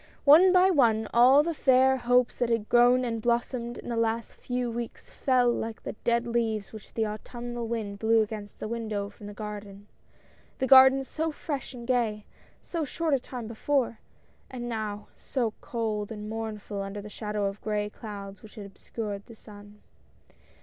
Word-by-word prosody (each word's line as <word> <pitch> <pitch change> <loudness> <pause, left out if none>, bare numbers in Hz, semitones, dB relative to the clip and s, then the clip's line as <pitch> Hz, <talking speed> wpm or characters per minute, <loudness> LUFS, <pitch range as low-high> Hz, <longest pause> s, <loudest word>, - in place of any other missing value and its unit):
One 325 +6 +8
by 370 +1 +5
one 225 -8 +3
all 255 +5 +7
the 335 +1 -1
fair 265 -2 +4
hopes 245 0 +2
that 245 -1 +1
had 230 -2 0
grown 245 +1 +5
and 230 -2 -2
blossomed 240 +1 -1
in - - -8
the 235 - -2
last 230 0 -1
few 245 -1 -3
weeks, 235 0 -6
fell 250 -2 +2
like 225 -1 -4
the - - -4
dead 235 0 +2
leaves 225 -3 -1
which 215 -2 -12
the 225 - +1
autumnal 240 +2 -5
wind 215 -3 -4
blew 225 0 +4
against 210 -1 -8
the - - -4
window 215 -3 -3
from 205 0 -12
the 205 - -9
garden 205 -2 -7 0.4
— - - -31
the 260 - 0
garden 265 +1 +8
so 320 +4 -3
fresh 285 -4 -5
and 240 -1 -8
gay, 230 -4 0 0.4
so 335 -2 -3
short 315 +2 -1
a 275 - +3
time 245 -1 -7
before 235 +1 -1 0.3
— - - -35
and 240 -2 -6
now 215 -3 -4
so 235 -5 -2
cold 220 -3 -3
and 210 -1 -6
mournful, 215 -2 -5
under 195 +1 -5
the 205 - -8
shadow 210 0 -3
of 200 +1 -4
gray 210 -1 -1
clouds 200 -3 -9
which 220 - -14
had 210 -3 -8
obscured 200 0 -6
the 230 - -12
sun. 205 -1 -15
230 Hz, 185 wpm, -28 LUFS, 210-250 Hz, 0.4 s, One